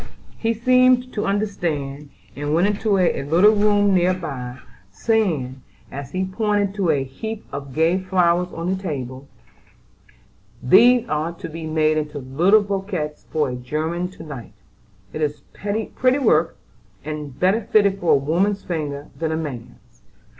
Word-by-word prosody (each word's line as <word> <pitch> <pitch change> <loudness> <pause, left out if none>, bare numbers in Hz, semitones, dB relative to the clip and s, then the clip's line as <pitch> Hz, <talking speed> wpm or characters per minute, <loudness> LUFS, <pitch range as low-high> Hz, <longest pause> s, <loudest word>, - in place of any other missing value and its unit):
He 230 0 -1
seemed 255 +2 +3
to 210 - -2
understand, 155 -9 -2 0.3
and 145 +2 -1
went 175 +3 +3
into 205 0 +1
a 180 -6 +2
little 170 +10 +5
room 205 -1 +3
near 180 0 +3
by, 130 -8 -6 0.3
saying, 140 - 0 0.3
as 140 -2 -7
he 185 0 -1
pointed 205 0 0
to 195 -4 0
a 145 -4 +2
heap 215 +12 -7
of 140 -1 -6
gay 165 +4 +3
flowers 180 -1 +1
on 165 +2 -4
the 190 0 -1
table: 135 -6 -5 1.4
"These 245 - +6
are 155 -1 -1
to 170 0 -8
be 160 0 -7
made 155 0 +2
into 150 -1 -5
little 165 +11 +3
bouquets 190 -6 -4
for 150 -3 0
a - - -4
'German' 155 +8 -3
to 165 - -11
night. 140 -7 -9 0.6
It 155 - -4
is 150 -1 -1
pretty 225 +5 0
work, 170 - +2 0.5
and 150 -3 -6
better 190 +5 +3
fitted 200 -3 +2
for 175 - +3
a - - +6
woman's 180 +9 0
fingers 145 -4 -4
than 160 -1 -1
a 160 - -1
man's. 135 -8 -8
170 Hz, 155 wpm, -22 LUFS, 150-205 Hz, 1.4 s, These